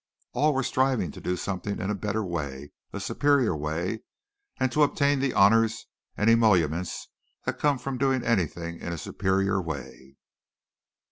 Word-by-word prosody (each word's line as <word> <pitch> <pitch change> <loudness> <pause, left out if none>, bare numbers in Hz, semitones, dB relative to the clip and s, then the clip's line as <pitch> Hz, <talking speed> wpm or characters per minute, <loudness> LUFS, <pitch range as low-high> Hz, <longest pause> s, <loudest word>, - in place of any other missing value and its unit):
All 150 -1 +2
were 135 - +1
striving 130 - +1
to - - -11
do 90 - -1
something 100 +2 -3
in 95 - -2
a - - 0
better 105 +1 -2
way, 70 -6 -5 0.2
a 100 - -5
superior 125 - +2
way, 80 +8 -3 0.6
and 130 - +1
to 150 - +1
obtain 145 -1 +3
the 135 -1 +1
honors 110 +3 +4 0.3
and 105 - +1
emoluments 90 -7 +2 0.4
that - - -2
come 145 -2 +2
from 130 0 -5
doing 135 -2 +2
anything 85 -6 -1
in 85 - -4
a - - -4
superior 95 +4 0
way. 70 -4 -8
100 Hz, 155 wpm, -27 LUFS, 85-130 Hz, 0.6 s, honors